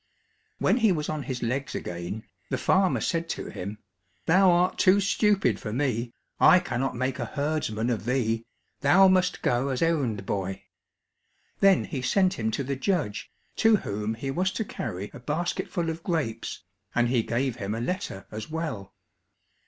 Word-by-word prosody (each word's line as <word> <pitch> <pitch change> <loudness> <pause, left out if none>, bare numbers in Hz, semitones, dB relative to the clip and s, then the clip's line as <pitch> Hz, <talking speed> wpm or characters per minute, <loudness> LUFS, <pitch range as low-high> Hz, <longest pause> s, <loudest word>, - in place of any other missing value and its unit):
When - - +2
he 225 -5 +4
was 150 -4 -1
on 155 -1 -2
his 130 -3 -4
legs 135 +4 -2
again, 90 +5 -5 0.3
the 130 - 0
farmer 190 +7 +3
said 165 -1 -1
to - - -4
him, 100 +4 -6 0.5
"Thou 185 +3 +5
art 180 +1 +2
too 190 +2 +5
stupid 200 - +2
for 105 - -5
me, 120 -2 -1 0.3
I 180 - +7
cannot 135 -5 -2
make 130 +2 -2
a 120 - -1
herdsman 140 -5 -1
of 110 -3 -2
thee, 115 -3 0 0.3
thou 195 +1 +6
must 185 -1 +2
go 125 +3 +1
as 130 +3 0
errand 130 -12 0
boy." 95 -1 -3 1.0
Then 195 -2 +5
he 135 - -4
sent 185 +8 +2
him 110 - 0
to 140 - -2
the 140 +1 -2
judge, 145 - -1 0.3
to 225 0 +5
whom 105 - -2
he 135 +4 -4
was 185 +6 0
to 220 - -2
carry 95 - -5
a - - -9
basketful 165 +4 -2
of 160 +1 -7
grapes, 145 -11 -3 0.3
and 120 0 +3
he 120 -2 +3
gave 120 +2 -1
him 105 -1 -3
a - - -3
letter 120 - -3
as 110 +6 -6
well. 155 - -4
135 Hz, 170 wpm, -27 LUFS, 115-175 Hz, 1.0 s, I